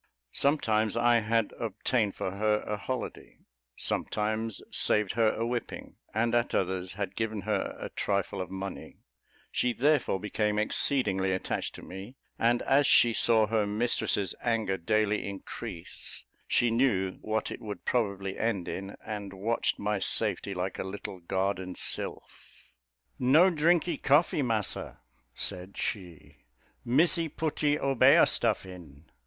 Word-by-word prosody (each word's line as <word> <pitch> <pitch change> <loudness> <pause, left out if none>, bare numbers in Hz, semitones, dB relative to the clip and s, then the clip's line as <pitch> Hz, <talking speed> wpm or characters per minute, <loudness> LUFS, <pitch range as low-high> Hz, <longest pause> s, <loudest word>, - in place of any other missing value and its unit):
Sometimes 110 -7 +2
I 120 0 +4
had 115 0 0
obtained 110 -6 0
for 95 - -3
her 105 +2 +1
a 105 - -3
holiday 125 +5 -5 0.4
sometimes 110 +1 -1
saved 105 -2 +3
her 115 -2 +3
a 115 - -1
whipping, 120 0 -5
and 115 +2 0
at 120 0 +1
others 95 -1 -1
had 100 0 -4
given 110 -2 -2
her 105 0 -2
a - - -5
trifle 100 -1 -1
of 90 - -5
money; 95 0 -7 0.5
she 125 -1 +1
therefore 135 -5 +2
became 105 +1 -1
exceedingly 105 -3 +1
attached 95 - -3
to - - -10
me, 95 +7 -9 0.2
and 120 +1 +2
as 140 +1 +4
she 120 -1 +5
saw 110 -1 +4
her 110 -1 0
mistress's 105 -3 0
anger 115 -5 0
daily 105 +3 +1
increase, 95 -3 -8 0.2
she 120 -1 +2
knew 110 -6 +1
what 110 +1 -2
it - - -7
would 105 -4 -7
probably 100 -5 -1
end 105 -6 -1
in, 95 +1 -5
and 105 -3 -5
watched 110 +5 0
my 105 0 -1
safety 100 0 +1
like 90 +1 -3
a - - -1
little 95 0 -7
guardian 95 +1 -2
sylph. - - -6 0.5
"No 155 +9 +5
drinkee 170 +1 +2
coffee, 145 +2 +3
Massa," 115 -6 -2 0.4
said 90 +2 -3
she, 90 -7 -5 0.5
"Missy 165 +6 +3
putty 150 -1 0
obeah 135 -3 +5
stuff - - +1
in." 85 -6 -12
105 Hz, 135 wpm, -29 LUFS, 95-120 Hz, 0.5 s, she